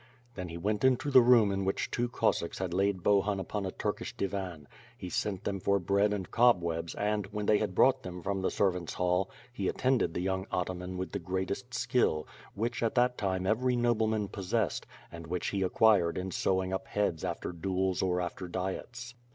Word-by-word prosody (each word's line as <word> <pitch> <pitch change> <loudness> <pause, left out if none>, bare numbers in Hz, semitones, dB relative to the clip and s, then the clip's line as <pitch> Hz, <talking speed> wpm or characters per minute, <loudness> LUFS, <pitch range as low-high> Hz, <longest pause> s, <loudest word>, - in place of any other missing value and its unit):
Then 90 -5 -5
he 85 - -6
went 105 +6 -1
into 130 +2 +3
the 130 - +9
room 120 -4 +5
in 95 0 -1
which 95 0 -1
two 120 0 0
Cossacks 85 -7 0
had 90 -2 -3
laid 95 -1 +1
Bohun 100 0 +3
upon 100 +1 -3
a - - -3
Turkish - - -4
divan; 90 -6 -4 0.3
he 90 - -6
sent 100 +1 -2
them 100 -1 -2
for 100 +2 +2
bread 100 +3 +2
and 95 -4 -3
cobwebs 85 -9 +2
and, 105 -1 -1
when 105 +1 -4
they 105 0 +4
had 100 -4 -2
brought 130 +3 +4
them 90 -4 -7
from 100 -1 -1
the 95 - +1
servant's 90 -4 0
hall, 90 +2 +1 0.2
he 100 -5 -2
attended 125 -10 +1
the - - -1
young 95 +1 -1
ataman 90 0 -3
with 95 +1 -4
the 100 - -3
greatest 95 +7 -3
skill, 120 - +1 0.3
which 115 +3 -2
at 115 -1 0
that 125 0 +3
time 95 -3 -1
every 125 +5 +2
nobleman 110 -3 +1
possessed, 100 -2 -2 0.2
and 85 -1 -9
which 90 +2 -2
he 100 - -2
ac 95 - +1
quired 100 -7 +4
in 95 +1 -3
sewing 95 +1 0
up 95 - -3
heads 100 -6 -1
after - - -3
duels 95 +1 -1
or 90 -1 +1
after 90 +1 -4
diets. 105 +7 -5
95 Hz, 200 wpm, -30 LUFS, 90-110 Hz, 0.3 s, the